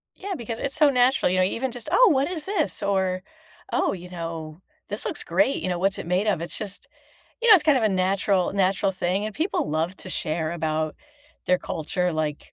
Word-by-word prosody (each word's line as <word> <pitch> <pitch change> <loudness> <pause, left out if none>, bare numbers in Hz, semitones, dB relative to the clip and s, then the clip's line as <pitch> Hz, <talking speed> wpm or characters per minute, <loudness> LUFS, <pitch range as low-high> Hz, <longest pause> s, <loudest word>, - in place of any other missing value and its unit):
Yeah, 395 +1 -5
because 230 -1 -5
it's 275 -1 -2
so 300 -2 +5
natural, 250 -6 +3
you 185 - +1
know? - - +5
Even 245 +7 -2
just, 240 -2 -6
"Oh, - - +6
what 275 +1 +2
is 330 -4 -4
this?" 385 -6 -1
or, 190 -2 0 0.5
"Oh, - - +1
you 180 -1 -8
know, 165 -2 -6 0.3
this - - 0
looks - - -1
great, 285 -2 +1
you - - -1
know, 175 -1 -1
what's 195 +1 +1
it - - -6
made 185 +4 +1
of?" 200 -6 +1
It's 170 - -3
just, 200 -2 -3 0.5
you 475 - +1
know, 435 - +11
it's 355 - +5
kind 300 -3 +5
of 225 - 0
a - - +4
natural 190 0 +1
natural 195 0 +1
thing, 185 +2 -1
and 215 -1 -5
people 320 - -1
love 160 +4 -1
to - - -7
share 160 -2 -1
about 155 -2 -2 0.5
their 180 0 +3
culture, 180 +3 -2
like 155 -2 -3
190 Hz, 220 wpm, -24 LUFS, 175-250 Hz, 0.5 s, know